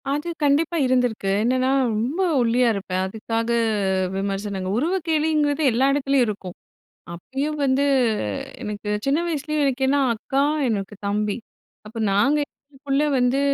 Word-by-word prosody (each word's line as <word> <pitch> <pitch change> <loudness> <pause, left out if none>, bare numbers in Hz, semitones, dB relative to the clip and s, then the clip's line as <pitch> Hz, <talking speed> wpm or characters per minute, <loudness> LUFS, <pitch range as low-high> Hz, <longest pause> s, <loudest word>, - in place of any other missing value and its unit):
அது 295 +4 -2 0.2
கண்டிப்பா 300 +4 +2
இருந்திருக்கு. 245 -6 +1
என்னன்னா, 255 +2 +2 0.2
ரொம்ப 255 - -1 0.2
ஒல்லியா 240 +1 +3
இருப்பேன். 185 -2 -3
அதுக்காக 225 +3 -3 0.7
விமர்சனங்கள். 195 -1 -3
உருவக் 335 +6 -1
கேலிங்கிறது 305 -2 +1
எல்லா 245 +4 +2
எடத்திலேயும் 275 -2 +2
இருக்கும். 195 -4 -5 0.6
அப்பயும் 270 - -4
வந்து 265 +1 +2 0.8
எனக்கு 210 -2 -5 0.2
சின்ன 275 +3 +2
வயசுலயே 305 -1 -2
எனக்கு 265 -1 0
ஏன்னா 285 +2 +3 0.2
அக்கா, 270 +5 -1 0.3
எனக்கு 205 -1 -3
தம்பி. 205 +1 -1 0.5
அப்ப 225 +2 -11
நாங்க 225 +10 +3
எங்களுக்குள்ள 280 0 -3
வந்து, 250 +2 +2
255 Hz, 125 wpm, -23 LUFS, 210-285 Hz, 0.8 s, ஒல்லியா